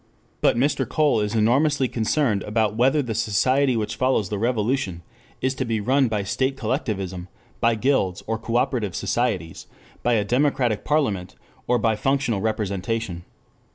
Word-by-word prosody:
But - - +3
Mr. 140 +4 +1
Cole 150 -7 +2
is 105 +1 -1
enormously 135 +5 +3
concerned 115 -2 0
about 105 0 0
whether 135 +5 +3
the 120 -3 -3
society 125 +5 +2
which 110 0 -3
follows 130 -6 +1
the 105 - -3
revolution 110 -6 -1 0.4
is 130 0 +1
to 130 - -2
be 115 -3 -1
run 130 +5 +2
by 105 -3 -1
state 130 +7 -1
collectivism, 100 - -3 0.3
by 115 0 +3
guilds 110 -7 0
or 115 0 -2
cooperative 115 -3 -1
societies, 105 -9 -2 0.3
by 120 - +1
a 105 -3 +2
democratic 125 -2 +1
parliament 105 - 0 0.3
or 125 - +3
by 110 -1 +1
functional 135 -3 0
representation. 100 -3 -2
115 Hz, 150 wpm, -23 LUFS, 105-130 Hz, 0.4 s, But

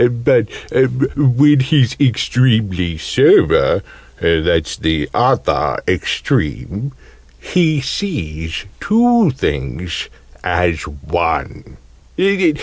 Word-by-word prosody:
But, 120 -2 +1 0.7
when 145 +1 +4
he's 130 -2 +2
extremely 110 - +1
sober - - +3 0.4
(that's 80 -1 +1
the 80 -2 -1
other - - +1
extreme), 100 - -2 0.5
he 160 - 0
sees 80 - -4
two 235 -2 +3
things 75 - -4 0.3
as 90 -2 0
one. 70 -2 -4
110 Hz, 70 wpm, -16 LUFS, -, 0.7 s, when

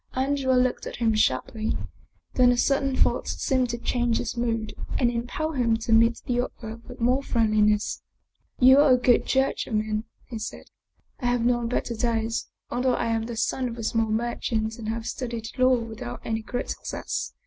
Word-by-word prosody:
Andrea 265 0 +1
looked 250 0 +1
at - - -6
him 230 -2 +1
sharply, 215 - 0 0.6
then 250 -1 +5
a 245 - +1
sudden 275 +1 +1
thought - - +1
seemed 255 -2 0
to 235 - -2
change 240 -1 0
his - - -3
mood 230 -2 -1 0.2
and 240 -2 +2
impel 245 +7 -3
him 240 -6 +1
to 225 0 -1
meet 230 +1 +4
the 245 -1 +1
other 220 -2 -7
with 250 - -10
more 250 +3 +2
friendliness. 215 -4 +2 0.3
" - - -45
You 260 +2 +7
are 290 -3 +6
a - - +5
good 245 -1 +3
judge 265 0 +1
of 225 - -2
men," 215 +1 -1 0.2
he 230 -3 -6
said. 215 - -7 0.3
" - - -42
I 245 - 0
have 245 -1 +1
known 240 -1 +2
better 235 0 -2
days, 230 0 -1 0.2
although 250 0 +1
I - - -1
am 225 0 -1
the 235 -1 -6
son 250 +3 0
of 235 - -7
a 230 - -5
small 225 0 +1
merchant 225 0 -1
and 220 -1 -4
have 225 0 -3
studied 235 -3 -4
law 255 0 +5
with 230 -2 -7
out 120 +1 -6
any 225 0 -1
great 245 +3 -4
success. - - -4
235 Hz, 200 wpm, -25 LUFS, 225-250 Hz, 0.6 s, You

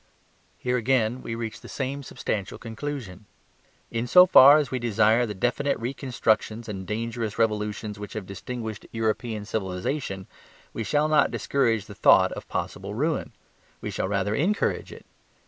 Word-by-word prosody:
Here 125 0 0
again 125 0 +1
we 115 - -5
reach 115 -1 -5
the - - -11
same 140 +1 -3
substantial 105 -6 -4
conclusion. 115 -5 -6 0.7
In 115 +1 -2
so 180 +8 +8
far 145 -4 +9
as 145 -4 -1
we 130 - -1
desire 115 +1 +3
the 105 - -5
definite 125 +7 0
reconstructions 115 -3 -1
and 100 -3 -5
the - - -9
dangerous 115 0 -3
revolutions 105 -2 -1
which 105 - -7
have 110 -3 -5
distinguished 110 +2 -6
European 110 -1 -2
civilization, 95 +1 -3 0.5
we 115 - -3
shall 150 +6 +1
not 155 -1 +4
discourage 115 -7 0
the 105 - -10
thought - - +5
of - - -7
possible 100 +2 -4
ruin; 155 +7 -1 0.5
we - - -5
shall - - -2
rather 100 +1 0
encourage 180 - 0
it. - - -12
115 Hz, 155 wpm, -26 LUFS, 105-130 Hz, 0.7 s, far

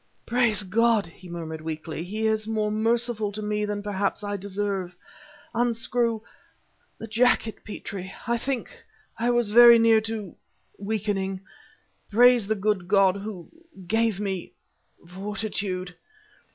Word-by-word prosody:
"Praise 235 -4 +2
God," 225 +2 +2
he 175 +2 -14
murmured, 160 -2 -6
weakly. 160 0 -5
"He 215 +5 -3
is 220 0 +1
more 215 -1 0
merciful 225 -1 0
to 215 - -4
me 210 0 -1
than 205 0 -3
perhaps 205 0 -2
I 205 0 -2
deserve. 195 -2 -3 0.6
Unscrew... 235 -1 0 0.8
the - - -7
jacket, 225 0 +2
Petrie... 195 -3 -7
I 235 -1 +1
think... 265 0 -3 0.5
I 235 +1 +1
was 240 -3 +2
very 235 +1 +9
near 225 -1 +5
to.... 220 -4 -5 0.4
weakening. 200 -2 -2 0.7
Praise 240 0 +5
the 220 - +1
good 200 -3 -1
God, 195 -1 +4
Who... 200 -3 -7 0.4
gave 225 +1 +1
me... 195 -3 -4 0.5
fortitude..." 195 -1 -4
210 Hz, 125 wpm, -25 LUFS, 195-225 Hz, 0.8 s, very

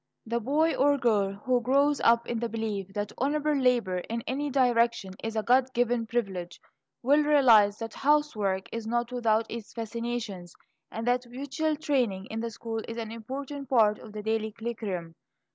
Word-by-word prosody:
The 235 +1 -1
boy 300 +7 +2
or 285 +1 +3
girl 210 -6 +2
who 250 -1 +2
grows 280 +4 +2
up 235 0 +4
in 235 - -2
the 235 0 -2
belief 215 -4 -3
that 205 0 -2
honorable 300 +3 +1
labor 245 -9 +2
in 230 +5 -5
any 285 +3 -2
direction 235 -6 +2
is 225 0 -3
a 220 - 0
God 255 +2 +3
given 240 -1 +1
privilege, 195 -7 -3 0.4
will 285 +4 +5
realize 235 -9 +5
that 225 -1 -6
housework 225 -10 +1
is 230 -1 -5
not 240 +1 -1
without 230 -3 +1
its 230 -2 -7
fascinations, 230 -5 -5 0.4
and 225 +1 -4
that 245 0 +1
manual 285 +5 -2
training 250 -11 0
in 220 - -3
the 230 +1 -2
school 225 0 -5
is 230 - -6
an 225 -1 -4
important 270 +4 -6
part 215 -5 +4
of 220 - -11
the 210 0 -7
daily 220 0 -1
curriculum. 210 -7 -5
235 Hz, 175 wpm, -28 LUFS, 220-260 Hz, 0.4 s, will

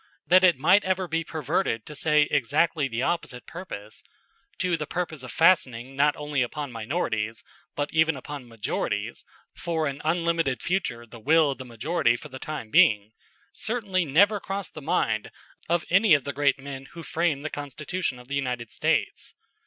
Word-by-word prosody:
That 185 +1 +5
it 175 -6 +6
might 185 +9 +5
ever 185 0 0
be 165 0 -1
perverted 155 - -1
to 150 0 +2
exactly 145 +3 +2
the 120 0 -2
opposite 130 -8 -2
purpose 110 - -8 0.6
to 180 -2 +1
the 150 -2 -4
purpose 165 -5 -3
of 125 - -8
fastening 135 -8 +3
not 145 +2 +3
only 150 -2 -2
upon 145 +2 -3
minorities 115 -2 -2 0.3
but 145 0 -2
even 160 -1 +3
upon 140 -1 -8
majorities 115 -2 -3 0.3
for 165 -2 -2
an 140 -1 -3
unlimited 165 -4 0
future 150 -11 -1
the 115 0 -12
will 155 +4 +4
of 135 - -7
the 130 - -7
majority 120 +2 +1
for - - -9
the 130 - -8
time 140 -8 -6
being 105 0 +5 0.4
certainly 205 -5 -1
never 200 +8 +4
crossed 195 -1 -5
the 155 - -8
mind 135 -8 0 0.4
of 170 -1 +1
any 195 -2 +6
of 140 - 0
the 140 - -4
great 145 -1 +2
men 135 -1 -8
who 170 - -8
framed 155 -3 -1
the 155 - -3
Constitution 145 +1 -4
of 125 0 -14
the 140 - -6
United 125 -4 -2
States. - - -1
150 Hz, 170 wpm, -26 LUFS, 125-170 Hz, 0.6 s, it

